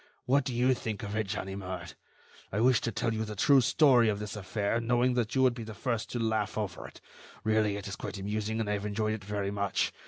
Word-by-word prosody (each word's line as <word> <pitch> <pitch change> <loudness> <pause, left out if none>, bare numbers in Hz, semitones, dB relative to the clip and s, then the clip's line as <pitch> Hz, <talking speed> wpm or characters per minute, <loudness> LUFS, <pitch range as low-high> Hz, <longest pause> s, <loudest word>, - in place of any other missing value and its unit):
What 135 +1 +3
do 130 - -2
you 125 +2 +4
think 110 -4 -4
of 105 +1 -4
it, 110 -2 0
Ganimard? 95 -4 -5 0.6
I 100 - -1
wished 125 0 +4
to 115 - 0
tell 115 - -1
you 110 0 -1
the 105 -1 -6
true 135 +6 +5
story 125 -3 +5
of 105 - 0
this 105 +1 -5
affair, 105 +3 -1
knowing 120 +2 +2
that 120 -1 -1
you 130 - +4
would 130 -2 +5
be 120 - -7
the 110 -1 -8
first 115 0 -2
to - - -1
laugh 110 -2 0
over 105 -5 -4
it. - - -14 0.4
Really, 110 -2 +2
it 100 - -6
is 100 - -4
quite - - -6
amusing, 105 +3 -2
and 110 - -1
I 105 - 0
have 100 0 -3
enjoyed 110 +1 0
it 110 -2 -5
very 100 0 -2
much. 100 -1 0
110 Hz, 245 wpm, -30 LUFS, 100-120 Hz, 0.6 s, true